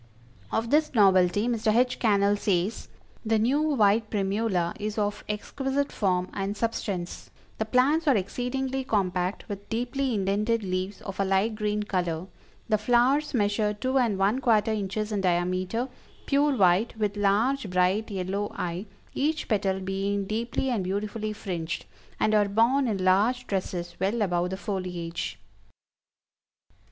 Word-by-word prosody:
Of 225 Hz, +1 st, -1 dB
this 305 Hz, -2 st, +2 dB
novelty 195 Hz, 0 st, +4 dB
Mr. 225 Hz, -2 st, +1 dB
H. 250 Hz, +1 st, +2 dB
Cannell 205 Hz, -2 st, +3 dB
says: 200 Hz, 0 st, -1 dB, 0.4 s
"The 225 Hz, -1 st, +2 dB
new 255 Hz, +7 st, +2 dB
white 220 Hz, -8 st, +3 dB
Primula 195 Hz, -3 st, 0 dB
is 210 Hz, +1 st, -3 dB
of 205 Hz, -1 st, -1 dB
exquisite 270 Hz, +6 st, -2 dB
form 185 Hz, -3 st, 0 dB
and 200 Hz, +1 st, -3 dB
substance; 200 Hz, -5 st, -3 dB, 0.3 s
the 220 Hz, -, 0 dB
plants 275 Hz, +8 st, +2 dB
are 270 Hz, -6 st, +5 dB
exceedingly 260 Hz, +6 st, -2 dB
compact, 185 Hz, -5 st, -1 dB
with 200 Hz, 0 st, -7 dB
deeply 245 Hz, +2 st, -1 dB
indented 210 Hz, +3 st, 0 dB
leaves 185 Hz, +1 st, -3 dB
of 195 Hz, -, -7 dB
a -, -, +3 dB
light 195 Hz, +3 st, +1 dB
green 210 Hz, -1 st, -1 dB
color; 175 Hz, -4 st, -2 dB, 0.4 s
the 215 Hz, -2 st, +2 dB
flowers 250 Hz, +6 st, +2 dB
measure 210 Hz, -1 st, +1 dB
two 260 Hz, +5 st, 0 dB
and 230 Hz, -6 st, +1 dB
one 200 Hz, +6 st, +2 dB
quarter 220 Hz, -3 st, +3 dB
inches 210 Hz, +1 st, -2 dB
in 205 Hz, -2 st, 0 dB
diameter, 185 Hz, +6 st, 0 dB, 0.4 s
pure 285 Hz, -1 st, +2 dB
white, 195 Hz, +4 st, +3 dB
with 210 Hz, -2 st, -1 dB
large, 210 Hz, +5 st, +1 dB
bright 185 Hz, +5 st, +1 dB
yellow 195 Hz, +1 st, -2 dB
eye, 175 Hz, +4 st, -4 dB, 0.3 s
each 305 Hz, +3 st, -1 dB
petal 195 Hz, -3 st, 0 dB
being 195 Hz, +1 st, -2 dB
deeply 235 Hz, +5 st, -2 dB
and 220 Hz, -6 st, 0 dB
beautifully 210 Hz, +3 st, -3 dB
fringed, 175 Hz, -6 st, -4 dB, 0.3 s
and 215 Hz, -, +2 dB
are 205 Hz, -1 st, +3 dB
borne 240 Hz, +6 st, +3 dB
in 195 Hz, -4 st, -1 dB
large 220 Hz, +7 st, +3 dB
trusses 175 Hz, -3 st, -3 dB
well 205 Hz, +4 st, +1 dB
above 175 Hz, -2 st, 0 dB
the 190 Hz, -, -4 dB
foliage." 180 Hz, -, -4 dB
210 Hz, 145 wpm, -27 LUFS, 190-235 Hz, 0.4 s, are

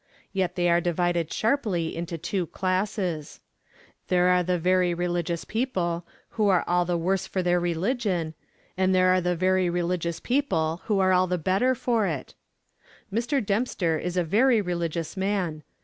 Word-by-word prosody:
Yet 190 Hz, -2 st, -1 dB
they 175 Hz, -1 st, +1 dB
are 170 Hz, 0 st, +3 dB
divided 175 Hz, -1 st, 0 dB
sharply 215 Hz, -, 0 dB
into 170 Hz, 0 st, -4 dB
two 170 Hz, +2 st, -2 dB
classes. 185 Hz, -4 st, -2 dB, 0.7 s
There 180 Hz, 0 st, +3 dB
are 180 Hz, 0 st, +4 dB
the 180 Hz, 0 st, 0 dB
very 180 Hz, 0 st, +2 dB
religious 175 Hz, -1 st, -2 dB
people 175 Hz, -8 st, -2 dB, 0.2 s
who 215 Hz, -2 st, +1 dB
are 180 Hz, -3 st, +3 dB
all 175 Hz, 0 st, +2 dB
the 175 Hz, 0 st, 0 dB
worse 190 Hz, +3 st, 0 dB
for 185 Hz, -, -2 dB
their 175 Hz, 0 st, +2 dB
religion, 175 Hz, -1 st, -1 dB, 0.4 s
and 185 Hz, 0 st, +2 dB
there 185 Hz, 0 st, +4 dB
are 185 Hz, 0 st, +4 dB
the 180 Hz, 0 st, 0 dB
very 185 Hz, +1 st, +2 dB
religious 170 Hz, -1 st, -1 dB
people 175 Hz, -, 0 dB
who 210 Hz, -3 st, +1 dB
are 185 Hz, -1 st, +3 dB
all 185 Hz, 0 st, +3 dB
the 180 Hz, 0 st, 0 dB
better 195 Hz, +10 st, +1 dB
for 230 Hz, -4 st, +1 dB
it. 150 Hz, -7 st, -4 dB, 0.8 s
Mr. 240 Hz, +2 st, 0 dB
Dempster 195 Hz, -6 st, 0 dB
is 180 Hz, 0 st, -3 dB
a 180 Hz, -, +3 dB
very 225 Hz, +8 st, +3 dB
religious 170 Hz, -3 st, -3 dB
man. 190 Hz, -5 st, -1 dB
180 Hz, 165 wpm, -26 LUFS, 170-195 Hz, 0.8 s, are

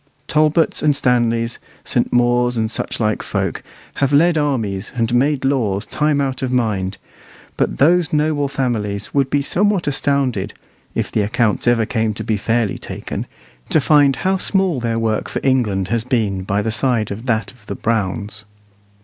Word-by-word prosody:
Talbots 155 Hz, +2 st, +2 dB
and 150 Hz, -2 st, +3 dB
Stanleys, 120 Hz, -3 st, +1 dB, 0.2 s
St. -, -, 0 dB
Maurs, 120 Hz, 0 st, +2 dB
and 110 Hz, 0 st, 0 dB
such -, -, -3 dB
like 110 Hz, -2 st, 0 dB
folk, -, -, -2 dB, 0.4 s
have 140 Hz, 0 st, +1 dB
led 165 Hz, +4 st, +4 dB
armies 115 Hz, -10 st, -1 dB
and 115 Hz, -1 st, 0 dB
made 135 Hz, +2 st, +2 dB
laws 110 Hz, -8 st, 0 dB
time 150 Hz, -1 st, 0 dB
out 135 Hz, -2 st, -1 dB
of 130 Hz, -1 st, -2 dB
mind; 105 Hz, -6 st, 0 dB, 0.6 s
but -, -, -1 dB
those 170 Hz, +3 st, +3 dB
noble 150 Hz, -1 st, +1 dB
families 115 Hz, -7 st, -2 dB
would 140 Hz, -2 st, +2 dB
be 145 Hz, 0 st, +1 dB
somewhat 200 Hz, +3 st, +1 dB
astounded 135 Hz, -8 st, 0 dB, 0.4 s
if -, -, -2 dB
the -, -, +1 dB
accounts 105 Hz, +2 st, 0 dB
ever 120 Hz, -2 st, +3 dB
came 110 Hz, -2 st, -1 dB
to 110 Hz, -, -5 dB
be 110 Hz, 0 st, 0 dB
fairly 110 Hz, 0 st, 0 dB
taken -, -, -6 dB, 0.4 s
to -, -, +4 dB
find 145 Hz, -1 st, +4 dB
how 190 Hz, +1 st, +3 dB
small 190 Hz, -5 st, +1 dB
their 115 Hz, -1 st, -1 dB
work 110 Hz, -1 st, -1 dB
for -, -, -3 dB
England 105 Hz, -8 st, +1 dB
has 115 Hz, -1 st, 0 dB
been 110 Hz, -6 st, 0 dB
by 100 Hz, +2 st, -1 dB
the 110 Hz, -, -1 dB
side 115 Hz, -2 st, 0 dB
of 110 Hz, +6 st, -6 dB
that 115 Hz, -2 st, 0 dB
of 120 Hz, -6 st, -23 dB
the -, -, -4 dB
Browns. 105 Hz, -1 st, -2 dB
120 Hz, 170 wpm, -19 LUFS, 110-140 Hz, 0.6 s, led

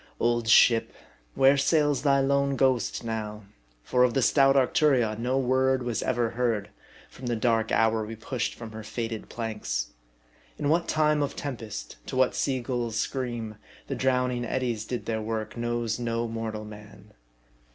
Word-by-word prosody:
Old 120 Hz, -1 st, +1 dB
ship! 115 Hz, +1 st, +5 dB, 0.4 s
where 135 Hz, +1 st, +5 dB
sails 145 Hz, -1 st, +2 dB
thy 140 Hz, -1 st, +3 dB
lone 140 Hz, 0 st, +1 dB
ghost 130 Hz, -3 st, +1 dB
now? 110 Hz, -2 st, -4 dB, 0.4 s
For 125 Hz, -, +2 dB
of 125 Hz, 0 st, +2 dB
the 135 Hz, -, +2 dB
stout 135 Hz, +1 st, +4 dB
Arcturion 130 Hz, -4 st, +3 dB
no 125 Hz, +3 st, 0 dB
word 130 Hz, 0 st, +2 dB
was 120 Hz, -2 st, -2 dB
ever 120 Hz, -2 st, 0 dB
heard, 115 Hz, -4 st, -1 dB, 0.4 s
from 130 Hz, -, -9 dB
the 120 Hz, -, 0 dB
dark 115 Hz, -1 st, +1 dB
hour 110 Hz, -1 st, +2 dB
we 110 Hz, +1 st, -6 dB
pushed 115 Hz, +3 st, -3 dB
from 115 Hz, -2 st, -9 dB
her 110 Hz, 0 st, -7 dB
fated 115 Hz, 0 st, -5 dB
planks. 105 Hz, -, -3 dB, 0.7 s
In 145 Hz, -, -1 dB
what 170 Hz, +2 st, +2 dB
time 150 Hz, -1 st, +2 dB
of 140 Hz, -, -2 dB
tempest, 110 Hz, -, -6 dB
to -, -, -5 dB
what 130 Hz, 0 st, +3 dB
seagull's 120 Hz, -4 st, -2 dB
scream, 120 Hz, -4 st, -3 dB, 0.3 s
the -, -, -4 dB
drowning 125 Hz, -1 st, 0 dB
eddies 120 Hz, -3 st, -2 dB
did 125 Hz, +1 st, -4 dB
their 110 Hz, -1 st, -2 dB
work, 110 Hz, 0 st, -4 dB
knows 120 Hz, -1 st, -2 dB
no 115 Hz, 0 st, -1 dB
mortal 110 Hz, -1 st, -4 dB
man. 105 Hz, 0 st, -13 dB
120 Hz, 160 wpm, -27 LUFS, 110-130 Hz, 0.7 s, ship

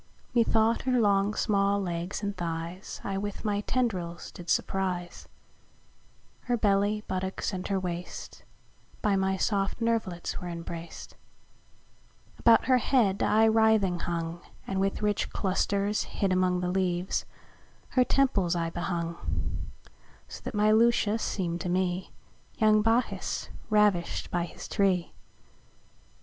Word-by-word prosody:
Me 235 Hz, -, +5 dB
thought, 225 Hz, 0 st, +2 dB
her 255 Hz, -1 st, +1 dB
long 200 Hz, -1 st, +3 dB
small 200 Hz, -1 st, +2 dB
legs 175 Hz, +1 st, -3 dB
& 200 Hz, -, -6 dB
thighs 170 Hz, +1 st, -5 dB
I 195 Hz, -1 st, -2 dB
with 205 Hz, +2 st, -5 dB
my 205 Hz, -1 st, +1 dB
Tendrils 185 Hz, -9 st, -2 dB
did 175 Hz, -1 st, -10 dB
surprize; 180 Hz, -2 st, -1 dB, 1.2 s
Her 245 Hz, -1 st, +1 dB
Belly, 205 Hz, 0 st, +2 dB
Buttocks, 190 Hz, +2 st, -2 dB
and 185 Hz, -1 st, -4 dB
her 195 Hz, -1 st, 0 dB
Waste 180 Hz, -1 st, -6 dB, 0.6 s
By 210 Hz, -3 st, +3 dB
my 190 Hz, 0 st, +1 dB
soft 195 Hz, 0 st, 0 dB
Nerv'lits 225 Hz, -7 st, -1 dB
were 180 Hz, -, -5 dB
embrac'd: 170 Hz, 0 st, -7 dB, 1.2 s
About 230 Hz, -1 st, +5 dB
her 255 Hz, -1 st, +4 dB
head 220 Hz, -6 st, +2 dB
I 220 Hz, +1 st, +4 dB
writhing 220 Hz, -5 st, +3 dB
hung, 170 Hz, 0 st, -3 dB, 0.2 s
And 190 Hz, -1 st, -2 dB
with 195 Hz, +2 st, 0 dB
rich 210 Hz, -1 st, 0 dB
clusters 200 Hz, +1 st, 0 dB
(hid 195 Hz, -2 st, -1 dB
among 180 Hz, -1 st, +2 dB
The 180 Hz, 0 st, -1 dB
leaves) 180 Hz, -1 st, 0 dB, 0.6 s
her 255 Hz, -, +4 dB
temples 205 Hz, -11 st, +2 dB
I 165 Hz, -1 st, -1 dB
behung: 170 Hz, -1 st, -3 dB, 1.1 s
So -, -, -9 dB
that -, -, -4 dB
my 210 Hz, +1 st, +4 dB
Lucia 225 Hz, -1 st, +3 dB
seem'd 175 Hz, -6 st, -2 dB
to 180 Hz, -, -3 dB
me 180 Hz, 0 st, -1 dB, 0.5 s
Young 215 Hz, -3 st, +5 dB
Bacchus 225 Hz, +3 st, 0 dB, 0.2 s
ravished 210 Hz, -5 st, +2 dB
by 175 Hz, -1 st, 0 dB
his -, -, -9 dB
tree. 190 Hz, -5 st, +1 dB
195 Hz, 130 wpm, -28 LUFS, 180-215 Hz, 1.2 s, Me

